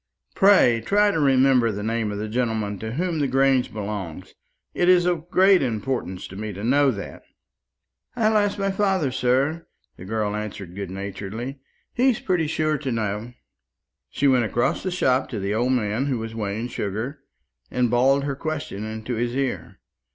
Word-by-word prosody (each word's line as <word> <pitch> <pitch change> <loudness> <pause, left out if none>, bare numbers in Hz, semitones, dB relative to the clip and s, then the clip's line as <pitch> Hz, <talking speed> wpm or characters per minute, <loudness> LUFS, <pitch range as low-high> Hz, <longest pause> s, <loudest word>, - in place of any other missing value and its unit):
"Pray 185 - +5
try 205 - +3
to 165 - -1
remember 130 -4 +4
the 105 0 -5
name 110 -1 -1
of 100 - -4
the 105 +1 -3
gentleman 110 -3 -1
to 110 0 -5
whom 170 +2 -1
the 145 - +1
Grange 135 -1 +2
belongs. 100 -6 -6 0.4
It 175 - +2
is 180 -1 +5
of 175 -1 -1
great 190 +1 +5
importance 110 -6 -3
to 95 - -10
me 105 +1 -5
to 100 +2 -7
know 140 +4 +4
that." 100 -6 -5 0.9
"I'll 220 -2 +2
ask 205 -1 +2
my 195 0 0
father, 190 -8 +1
sir," 135 +6 0 0.3
the 90 - -10
girl 105 0 -1
answered 105 -4 -6
good 100 -2 -5
naturedly; 100 +7 -6 0.3
"he's 250 -2 +2
pretty 175 -4 0
sure 155 -1 0
to 135 -3 -3
know." 110 +1 -3 0.8
She 145 - +1
went 130 -3 +4
across 120 +3 0
the 185 - -2
shop 130 -8 +1
to 115 - -4
the 100 +1 -2
old 120 +4 +1
man 115 +2 0
who 130 -3 0
was 115 0 -5
weighing 110 +2 -3
sugar, 115 +7 -4 0.5
and 125 -2 0
bawled 135 +3 +3
her 140 -1 -2
question 145 -9 -4
into 110 +2 -5
his 120 +1 -2
ear. 135 -1 -3
125 Hz, 175 wpm, -23 LUFS, 105-150 Hz, 0.9 s, Pray